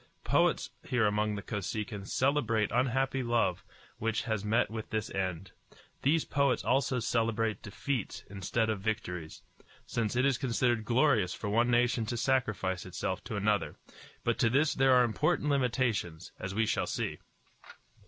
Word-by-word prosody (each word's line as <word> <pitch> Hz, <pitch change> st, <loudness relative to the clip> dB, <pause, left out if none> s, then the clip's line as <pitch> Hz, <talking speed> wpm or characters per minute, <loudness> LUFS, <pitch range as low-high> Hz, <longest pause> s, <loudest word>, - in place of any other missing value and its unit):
Poets -, -, +2 dB
here 125 Hz, -4 st, +1 dB
among 105 Hz, 0 st, +1 dB
the 100 Hz, -, -5 dB
Kosekin 105 Hz, -1 st, -4 dB
celebrate 120 Hz, -6 st, +1 dB
unhappy 130 Hz, +2 st, +1 dB
love 120 Hz, -7 st, +1 dB, 0.4 s
which 115 Hz, 0 st, 0 dB
has 110 Hz, -4 st, -2 dB
met 110 Hz, +2 st, +1 dB
with 110 Hz, -1 st, -5 dB
this 110 Hz, 0 st, -2 dB
end. 95 Hz, -1 st, -3 dB, 0.5 s
These 155 Hz, +4 st, +2 dB
poets 140 Hz, -2 st, +1 dB
also 130 Hz, 0 st, +2 dB
celebrate 115 Hz, -2 st, 0 dB
defeats 120 Hz, +3 st, -4 dB
instead 100 Hz, +3 st, -1 dB
of 105 Hz, -3 st, -3 dB
victories, 90 Hz, -7 st, -4 dB, 0.4 s
since 115 Hz, -1 st, -2 dB
it 130 Hz, +2 st, +3 dB
is 135 Hz, -3 st, +2 dB
considered 120 Hz, -3 st, +1 dB
glorious 120 Hz, -6 st, +3 dB
for 110 Hz, -4 st, -4 dB
one 115 Hz, +4 st, +3 dB
nation 120 Hz, -1 st, +2 dB
to 120 Hz, -, -2 dB
sacrifice 110 Hz, -8 st, 0 dB
itself 95 Hz, 0 st, -4 dB
to 120 Hz, -2 st, -4 dB
another; 105 Hz, 0 st, 0 dB, 0.5 s
but -, -, 0 dB
to 115 Hz, -, +4 dB
this 150 Hz, +6 st, +3 dB
there 135 Hz, -1 st, +4 dB
are 125 Hz, -, +6 dB
important 145 Hz, +5 st, +1 dB
limitations, 120 Hz, -, 0 dB
as 95 Hz, +1 st, -5 dB
we 115 Hz, +1 st, +2 dB
shall -, -, 0 dB
see. -, -, -3 dB
115 Hz, 155 wpm, -31 LUFS, 105-125 Hz, 0.5 s, are